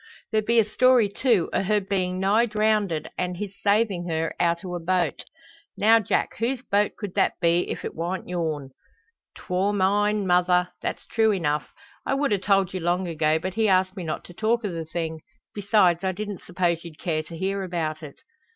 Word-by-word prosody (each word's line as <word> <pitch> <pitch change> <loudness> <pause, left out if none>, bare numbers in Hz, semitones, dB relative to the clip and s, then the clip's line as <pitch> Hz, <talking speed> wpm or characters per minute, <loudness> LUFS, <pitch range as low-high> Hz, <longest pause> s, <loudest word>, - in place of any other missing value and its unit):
"There 215 -1 +2
be 235 +2 +1
a 225 - +5
story, 245 +1 +4
too, 210 -4 +1
o' - - +2
her 210 +2 +2
bein' 185 -2 -2
nigh 210 +5 +3
drownded 210 -7 0
an' 180 0 -1
his 200 +2 -5
saving 200 -4 +1
her 160 0 -1
out 170 0 +1
o' 180 - -5
a 175 - -3
boat. 175 -2 0 0.5
Now, 225 +2 +5
Jack, 215 - -1
whose 250 +2 -1
boat 205 -4 +1
could 205 -4 -6
that - - +2
be 170 0 +2
if - - -4
it - - -4
wa'nt 175 +3 -4
your'n?" 155 -6 -3 0.6
"'Twor 190 +3 -1
mine, 205 +1 +2
mother; 180 0 +3
that's - - -4
true 220 -1 +2
enough. 150 -6 -1 0.3
I 270 - 0
would 275 -5 +1
a 200 - +1
told 195 -1 +2
you 185 - -2
long 175 +2 0
ago, 155 -1 +1
but 185 +3 -4
he 220 +2 +1
asked 185 0 +2
me 185 - -5
not 155 -2 -4
to 175 - -13
talk 225 +4 0
o' 200 - -2
the 165 -1 -5
thing. 160 0 -4 0.3
Besides, 195 -4 +2
I 190 0 0
didn't 205 0 -6
suppose 175 -2 -1
you'd 165 -3 -10
care 155 +1 -1
to 165 +1 -10
hear 195 +2 -1
about 165 -4 -3
it." 145 -3 -11
185 Hz, 200 wpm, -25 LUFS, 170-210 Hz, 0.6 s, a